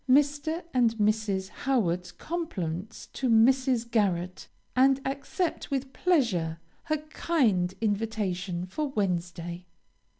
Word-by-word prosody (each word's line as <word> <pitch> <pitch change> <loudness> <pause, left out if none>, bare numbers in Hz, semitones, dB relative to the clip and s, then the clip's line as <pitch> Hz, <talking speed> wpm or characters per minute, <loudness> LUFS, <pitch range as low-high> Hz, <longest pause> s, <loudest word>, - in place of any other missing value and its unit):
Mr. 290 +5 +3
and 235 -3 +3
Mrs. 210 -3 +1
Howard's 180 -11 0
compliments 210 - -4
to 260 - -1
Mrs. 240 +1 +4
Garret, 185 -5 0 0.3
and 265 +1 +5
accept 280 +6 -2
with 270 -1 -2
pleasure 200 - +1 0.3
her 310 -1 +1
kind 260 - +1
invitation 200 -5 -1
for 295 +12 -2
Wednesday. 175 -6 -2
225 Hz, 100 wpm, -28 LUFS, 180-275 Hz, 0.3 s, and